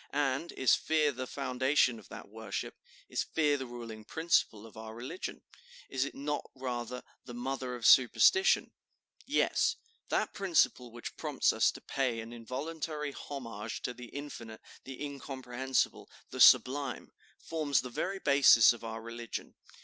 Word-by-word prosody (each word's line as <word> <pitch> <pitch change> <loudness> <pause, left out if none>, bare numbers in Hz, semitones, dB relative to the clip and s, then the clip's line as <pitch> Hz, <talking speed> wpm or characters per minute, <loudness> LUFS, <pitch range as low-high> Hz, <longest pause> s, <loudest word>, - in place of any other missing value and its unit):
And 140 +3 0
is 130 - +3
fear 155 -2 +2
the 130 -1 -5
foundation 130 -2 +1
of - - -17
that - - -9
worship? 110 -1 -5 0.3
Is - - -1
fear 150 -2 +1
the 130 -2 -4
ruling 115 -3 -8
principle 115 -6 0
of 115 - -14
our 110 0 -8
religion? 120 +3 -6 0.5
Is 135 0 0
it - - -7
not 145 +1 -3
rather 125 -1 -4 0.2
the 120 - -8
mother 130 0 -3
of 120 -2 -6
superstition? 375 - +5 0.6
Yes, 455 0 +2 0.3
that - - 0
principle 165 -10 +1
which 120 +1 -8
prompts - - +1
us - - +4
to - - -11
pay 130 -4 -1
an 115 +1 -7
involuntary 150 +5 -4
homage 115 -7 -6
to 125 - -2
the 120 0 -10
infinite, 115 -5 -8 0.2
the 135 -1 -8
incomprehensible, 130 -2 -2 0.2
the - - -6
sublime, 135 -1 +5 0.3
forms 150 -5 0
the 125 - -8
very 195 +10 -2
basis 140 - +6
of 120 - -12
our 110 0 -6
religion. 115 0 -6
130 Hz, 150 wpm, -31 LUFS, 120-145 Hz, 0.6 s, basis